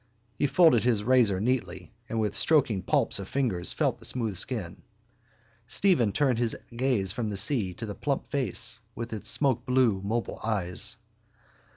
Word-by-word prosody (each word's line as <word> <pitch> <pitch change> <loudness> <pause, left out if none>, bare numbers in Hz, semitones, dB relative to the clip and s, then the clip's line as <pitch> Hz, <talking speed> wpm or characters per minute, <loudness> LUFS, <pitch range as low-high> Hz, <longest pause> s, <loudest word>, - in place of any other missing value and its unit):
He 145 - 0
folded 160 -6 +4
his 115 -4 +1
razor 115 -5 +3
neatly 95 -6 -3 0.2
and 115 - -2
with 105 -2 -1
stroking 120 -2 +2
palps - - +1
of 95 - -7
fingers 110 -11 0
felt - - -1
the - - -8
smooth 115 -5 0
skin. 90 -3 -2 0.9
Stephen 130 - +2
turned 130 -1 0
his 120 -2 -1 0.2
gaze 120 -7 0
from 110 +1 -4
the 100 - -3
sea 105 -1 +3
and 90 - -12
to 110 - -5
the 105 - -6
plump 140 +5 -3
face 120 -3 -1 0.2
with 115 0 -6
its 105 - -2
smokeblue 125 -6 +1
mobile 115 +3 -3
eyes. 95 -5 +2
115 Hz, 165 wpm, -27 LUFS, 100-130 Hz, 0.9 s, folded